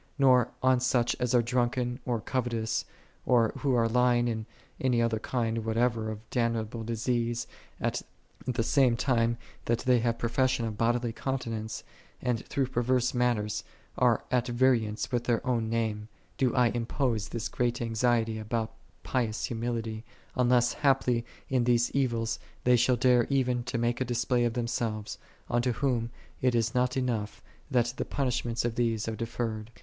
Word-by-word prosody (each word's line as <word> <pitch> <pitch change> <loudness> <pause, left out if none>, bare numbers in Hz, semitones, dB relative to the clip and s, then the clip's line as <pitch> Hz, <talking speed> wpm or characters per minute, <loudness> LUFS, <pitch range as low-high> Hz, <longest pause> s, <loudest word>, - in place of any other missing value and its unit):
Nor 130 -4 +5
on 130 -1 +4
such 125 -1 +2
as 125 0 +1
are 120 - +5
drunken, 125 +1 0
or 120 -2 0
covetous, 115 -2 -1 0.4
or 120 -3 +3
who 135 -3 +1
are 115 -1 +3
lying 120 0 +3
in 110 -1 -3 0.3
any 125 -2 +2
other 115 -1 +1
kind 115 -1 -1
whatever 115 0 0
of 110 0 -7
damnable 115 -1 -1
disease, 115 +1 -1 0.3
at - - -1 0.5
the 125 -2 0
same 125 -1 +3
time 115 -3 +1 0.3
that 115 0 +1
they 125 -1 +3
have 115 0 0
profession 120 +1 +1
of 110 -2 -3
bodily 120 +1 +1
continence, 115 -4 -3 0.4
and 120 -3 -1
through 135 - 0
perverse 125 0 +1
manners 120 -4 0 0.3
are - - +3
at 125 -1 +2
variance 120 -3 +1
with 120 -1 0
their 120 -2 0
own 115 -3 0
name, 110 -2 -1 0.3
do 130 -4 +2
I 125 -2 +4
impose 115 -1 -1
this 115 -2 -3
great 120 0 -1
anxiety 115 -1 +1
about 110 +1 -2 0.3
pious 115 -4 -1
humility: 115 -2 -3 0.3
unless 125 -1 +3
haply 125 -4 +2 0.2
in 125 -3 +1
these 120 -1 +3
evils 115 -4 0 0.2
they 125 0 +5
shall 125 +1 +3
dare 125 -1 +4
even 125 -3 +1
to 125 -1 -2
make 120 +2 0
a - - +2
display 120 0 +1
of 120 - 0
themselves, 115 -3 -2 0.3
unto 120 +1 +1
whom 120 -3 0 0.3
it 125 -1 +2
is 115 -1 +1
not 125 +1 +1
enough, 115 -5 -2 0.3
that 120 -1 +2
the - - 0
punishments 120 -3 -1
of 120 - 0
these 115 -2 0
are 115 - -2
deferred. 115 -1 -3
120 Hz, 160 wpm, -29 LUFS, 115-125 Hz, 0.5 s, Nor